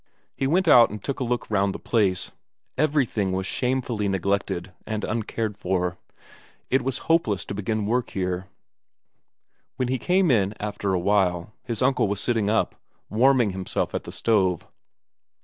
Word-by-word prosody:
He 135 - 0
went 175 +5 +2
out 120 -6 +8
and 105 - -6
took 140 - -3
a - - 0
look 120 -1 -2
round 100 -1 +1
the - - -3
place; 100 -6 0 0.4
everything 130 -9 +1
was 95 0 -1
shamefully 125 -2 -1
neglected 95 -1 -1
and 110 -1 -3
uncared 110 -2 -2
for; 90 -1 -1 0.7
it 130 - +3
was 130 0 -2
hopeless 140 - +2
to - - -5
begin 105 +1 -2
work 120 +3 0
here. 90 -1 -3 1.3
When 125 -1 -1
he 130 0 0
came 180 0 +3
in 105 -3 +2
after 105 -2 -2
a - - +1
while, 95 -1 +1
his 120 -1 -2
uncle 130 -4 +3
was 100 0 -2
sitting 110 -4 0
up, 110 - +1 0.4
warming 125 -1 +4
himself 95 0 -1
at - - -3
the - - -7
stove. 95 -7 +1
105 Hz, 160 wpm, -25 LUFS, 95-125 Hz, 1.3 s, out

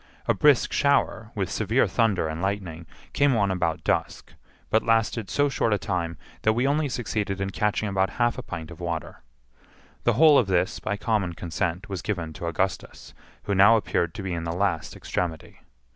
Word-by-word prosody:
A - - +4
brisk 145 -5 +3
shower, 140 -6 +1
with 95 -4 -2
severe 110 +4 +2
thunder 110 -8 +1
and 80 +2 -4
lightning, 90 -4 -3 0.3
came 140 -2 +3
on 100 -3 +2
about 85 -3 -1
dusk, - - -2 0.4
but 110 - +4
lasted 115 -2 +1
so 145 0 +2
short 115 -5 0
a - - +2
time 85 -2 -3 0.2
that 110 - +3
we 120 +3 0
only 145 +1 +1
succeeded 110 -5 -2
in 95 0 -2
catching 105 +1 0
about 95 -1 +1
half 120 -1 +2
a - - -3
pint 80 -4 -7
of 85 - -11
water. 85 -3 -5 0.8
The 120 - +4
whole 150 +4 +6
of 115 - 0
this, 90 -1 0
by 105 - -3
common 100 -5 0
consent, 85 +3 -3
was 95 -4 -4
given 85 -7 -3
to 85 - -6
Augustus, 95 +3 -3 0.3
who 100 - -1
now 100 +4 +7
appeared 85 -6 -1
to 100 - -6
be 95 -2 -3
in 85 -1 -3
the 85 - -3
last 85 -4 -1
extremity. 80 -3 -4
100 Hz, 190 wpm, -25 LUFS, 85-115 Hz, 0.8 s, now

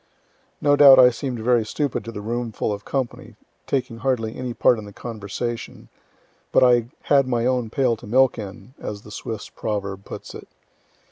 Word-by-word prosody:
(No 145 0 +4
doubt 140 -2 +9
I 125 -1 +8
seem'd 125 0 -4
very 120 0 +3
stupid 140 +5 -2
to 115 - -6
the 105 - -7
roomful 115 -1 -2
of 100 -1 -7
company, 130 -3 -4 0.3
taking 130 -3 -2
hardly 115 -3 -1
any 125 -1 -4
part 120 0 +3
in 105 - -8
the 100 - -11
conversation; 115 +2 -6 0.6
but - - +5
I 120 -2 +4 0.2
had 140 -2 +3
"my 120 -2 0
own 125 -3 0
pail 125 0 +1
to - - -12
milk 130 +2 +3
in," 100 +3 -9
as 105 -1 -6
the 105 - -13
Swiss 110 0 -6
proverb 100 -2 -4
puts - - -9
it.) - - -10
120 Hz, 180 wpm, -23 LUFS, 110-130 Hz, 0.6 s, doubt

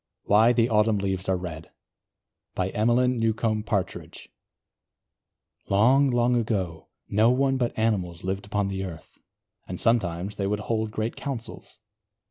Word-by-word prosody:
WHY 110 +3 +5
THE 120 -1 +3
AUTUMN 105 -1 +2
LEAVES 95 -1 -2
ARE 95 - +2
RED 85 -3 -7 0.9
EMELYN 120 +6 +1
NEWCOMB 110 -1 0
PARTRIDGE 100 -5 -3 1.4
Long, 130 +8 +4
long 120 0 +2
ago 95 -8 -2 0.2
no 110 +3 +3
one 135 +1 +2
but 120 -2 -2
animals 95 -7 -1
lived 95 +2 -3
upon 100 -1 -1
the 95 0 -3
earth 85 -4 -9 0.5
and 90 - -5
sometimes 100 -3 0
they 100 - -1
would 105 +1 -1
hold 110 0 -1
great 110 +2 -3
Councils. 130 -5 -7
105 Hz, 130 wpm, -25 LUFS, 95-115 Hz, 1.4 s, WHY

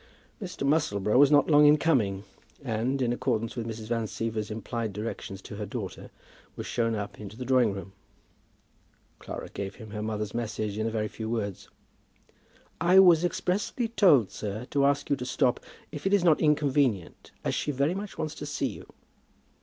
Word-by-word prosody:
Mr. 180 -7 -4
Musselboro 105 -10 +1
was 145 -1 +7
not 145 -1 +5
long 150 -1 +6
in 150 +1 +7
coming, 105 -12 +1 0.4
and, 125 +2 -1
in 120 -1 +1
accordance 115 -2 -1
with 115 -2 -4
Mrs. 110 -1 -6
Van 115 -1 -1
Siever's 110 -1 -3
implied 110 0 -4
directions 105 -2 -6
to 105 - -8
her 105 - -4
daughter, 100 -4 -6 0.5
was - - -6
shown 115 -2 0
up 105 -1 -5
into 105 +1 -9
the 125 - -5
drawing 125 -4 +3
room. 95 0 -7 1.3
Clara - - -7
gave 100 -1 -6
him 110 -3 -11
her 105 0 -4
mother's 105 -1 -3
message 110 -3 -3
in 110 - 0
a - - 0
very 110 -1 -1
few 110 +1 -6
words. 105 -5 -3 1.1
"I 180 +3 +4
was 175 -3 +7
expressly 185 +6 -1
told, 165 - +4
sir, 105 +3 -5
to 140 -1 +3
ask 140 0 0
you - - +5
to 125 - -5
stop, 125 -1 +1 0.3
if 150 +5 -4
it 200 - +4
is 195 - +1
not 165 -4 +4
inconvenient, 140 - +1
as - - -1
she - - -2
very 140 +4 +1
much 200 +1 -6
wants 155 -1 -3
to - - -7
see - - -1
you." - - -10
120 Hz, 185 wpm, -28 LUFS, 105-150 Hz, 1.3 s, was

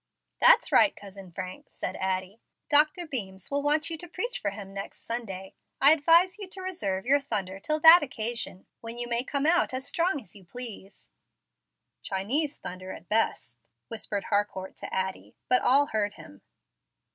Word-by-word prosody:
"That's - - +6
right, 295 - +5
Cousin 195 -2 -12
Frank," 185 +2 -8
said 185 - -5
Addie. 190 +3 -3 0.3
"Dr. 300 +4 +5
Beams 195 - -6
will 285 0 0
want 300 +2 +1
you 325 - -5
to 350 - -8
preach 455 +8 -4
for 200 - -1
him 200 -1 -9
next 195 0 -7
Sunday. 195 -5 -5 0.3
I 280 +2 +7
advise 335 +5 +4
you 400 - -7
to 375 +1 -9
reserve 200 - -3
your 280 +3 +4
thunder 200 -8 -3
till 305 +9 -1
that 330 +2 +10
occasion, 230 -7 -4
when 230 +1 -7
you 240 0 -2
may 240 0 0
come 280 +1 -2
out 330 -5 +2
as 260 +1 -4
strong 335 +1 0
as 220 - -15
you 200 - -13
please." 205 -1 -10 0.9
"'Chinese 265 +11 -1
thunder' 185 +1 -8
at 170 - -13
best," 120 - 0 0.3
whispered 210 -3 -4
Harcourt 205 -2 -2
to - - -8
Addie; 190 0 -4
but 250 - +3
all 280 +3 +5
heard 210 -5 -2
him. 100 - -14
230 Hz, 170 wpm, -27 LUFS, 195-295 Hz, 0.9 s, that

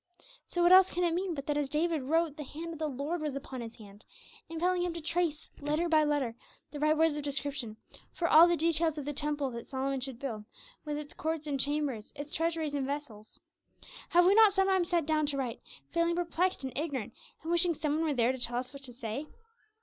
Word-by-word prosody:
So 350 - 0
what 345 - +6
else 375 0 +8
can 360 - -1
it 340 -1 +2
mean 360 0 -1
but 275 -1 -5
that 295 -1 0
as 285 -2 -2
David 315 +1 +1
wrote, 320 +3 +1
the 300 - -6
hand 330 +4 -7
of 320 - -9
the 310 - 0
Lord 295 +5 -3
was 300 -3 -2
upon 265 -2 -6
his 230 0 -8
hand, 205 -1 -14 0.5
impelling 355 +2 0
him 350 -1 -2
to - - -4
trace, 325 -1 -2
letter 300 +4 0
by 315 -2 +4
letter, 290 -6 0 0.4
the 295 - -6
right 305 +1 +3
words 320 -1 +3
of - - -2
description 275 -5 -3 0.3
for 340 - -1
all 325 +1 +8
the 345 0 +2
details 325 -1 +1
of 290 - -4
the 295 - -3
temple 290 -2 -1
that 235 0 -7
Solomon 270 0 -2
should 260 -2 -4
build, 230 -5 -5 0.4
with 295 -1 -2
its 295 -1 -7
courts 320 -1 -3
and 285 -2 -2
chambers, 280 -6 -1
its 290 +1 -7
treasuries 325 -2 -1
and 275 -2 -1
vessels? 275 -7 -6 0.7
Have 350 0 +5
we 380 - +6
not 435 -1 +7
sometimes 385 -2 +2
sat 340 -3 +1
down 305 -1 +1
to 285 -1 -1
write, 250 -3 -3 0.3
feeling 335 0 +1
perplexed 350 0 0
and 260 -2 -5
ignorant, 280 -7 -3 0.3
and 325 - -3
wishing 345 0 +4
some 300 0 -1
one 320 - 0
were 305 - +1
there 240 0 +3
to 260 - -6
tell 240 0 0
us 255 +3 -4
what 280 - -10
to 255 -3 -9
say? 235 +4 -5
300 Hz, 230 wpm, -31 LUFS, 275-335 Hz, 0.7 s, else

